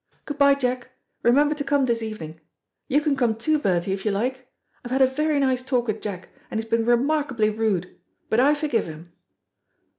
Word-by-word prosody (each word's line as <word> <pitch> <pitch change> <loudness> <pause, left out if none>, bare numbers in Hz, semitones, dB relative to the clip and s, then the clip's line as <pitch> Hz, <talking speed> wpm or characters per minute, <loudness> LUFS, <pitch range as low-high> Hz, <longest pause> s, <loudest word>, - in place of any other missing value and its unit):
Good 290 -1 -6
bye, 280 0 +6
Jack. 250 -2 -2 0.3
Remember 290 +5 +4
to 295 -1 -4
come 285 -1 +2
this 235 -2 0
evening. 165 -8 -7 0.5
You 290 +3 +2
can 295 -2 +1
come, 240 -4 +1
too, 305 +7 +1
Bertie, 185 -5 0
if 190 0 -5
you 215 - +1
like. 250 +5 -2 0.4
I 245 - -7
have 260 +2 0
had - - +2
a - - +8
very 300 +3 0
nice 260 -2 +1
talk 255 -2 0
with 220 -2 -3
Jack, 185 -4 -6 0.2
and 220 - -2
he - - -2
has 225 - -20
been 230 0 +1
remarkably 255 -3 +2
rude, 210 -5 -2 0.3
but 220 - +1
I 285 +4 +5
forgive 290 -7 0
him." 165 +2 -10
245 Hz, 210 wpm, -24 LUFS, 215-280 Hz, 0.5 s, a